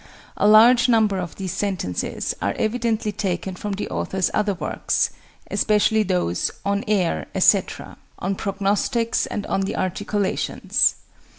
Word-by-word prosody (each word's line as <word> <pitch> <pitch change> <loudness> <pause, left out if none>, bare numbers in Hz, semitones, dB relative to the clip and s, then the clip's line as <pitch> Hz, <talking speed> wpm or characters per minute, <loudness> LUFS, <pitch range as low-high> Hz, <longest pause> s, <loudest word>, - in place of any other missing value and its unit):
A 205 - +2
large 240 +4 +6
number 215 -4 +3
of 175 -3 -5
these 190 -2 -4
sentences 185 - -2
are 100 - -1
evidently 225 -1 -1
taken 190 -2 -3
from 205 +2 -4
the 200 - -4
author's 190 -1 -1
other 210 -2 0
works, - - -1 0.4
especially 215 +1 +2
those 180 - 0 0.2
"On 200 +1 0
Air," 175 - 0
etc., - - +1 0.2
"On 190 +2 -2
Prognostics," 205 +4 0
and 205 - -4
"On 195 - -1
the 195 - -2
Articulations." 200 +2 0
200 Hz, 130 wpm, -22 LUFS, 185-215 Hz, 0.4 s, large